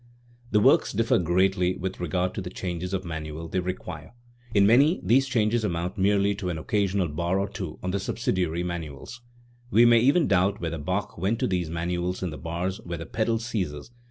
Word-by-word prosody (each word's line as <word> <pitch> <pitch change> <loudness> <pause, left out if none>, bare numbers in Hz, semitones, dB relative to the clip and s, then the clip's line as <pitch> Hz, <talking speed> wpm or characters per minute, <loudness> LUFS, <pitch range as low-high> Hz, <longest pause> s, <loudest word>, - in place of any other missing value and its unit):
The 105 - +3
works - - +4
differ - - +2
greatly 90 +1 +2
with 95 +1 -5
regard 90 +2 -1
to 100 - -4
the 90 - -6
changes 90 -1 -4
of 95 -1 -2
manual 80 0 -5
they 95 - -1
require. 90 -1 -6 0.4
In 100 -1 +4
many 140 - +5
these 130 +8 +3
changes 115 -2 +1
amount 90 -2 -2
merely 100 +1 +3
to 95 -3 -3
an 85 - -3
occasional 100 +2 0
bar 85 +5 -1
or 100 +1 0
two 95 -5 -6
on 90 - -1
the 100 - -1
subsidiary 90 -5 -1
man 85 -1 -3
uals; 75 - -9 0.5
we 115 +1 +6
may 120 -1 +6
even 140 +7 +4
doubt 95 +2 +2
whether 80 -1 -3
Bach 100 +7 -3
went 100 +5 0
to - - 0
these 90 -4 -1
manuals 85 +2 -2
in 90 - -2
the 75 - -8
bars 90 +4 -3
where 85 -1 -5
the 80 - -6
pedal 115 +3 0
ceases, 100 -11 -4
e. 120 - -30
95 Hz, 205 wpm, -26 LUFS, 85-105 Hz, 0.5 s, we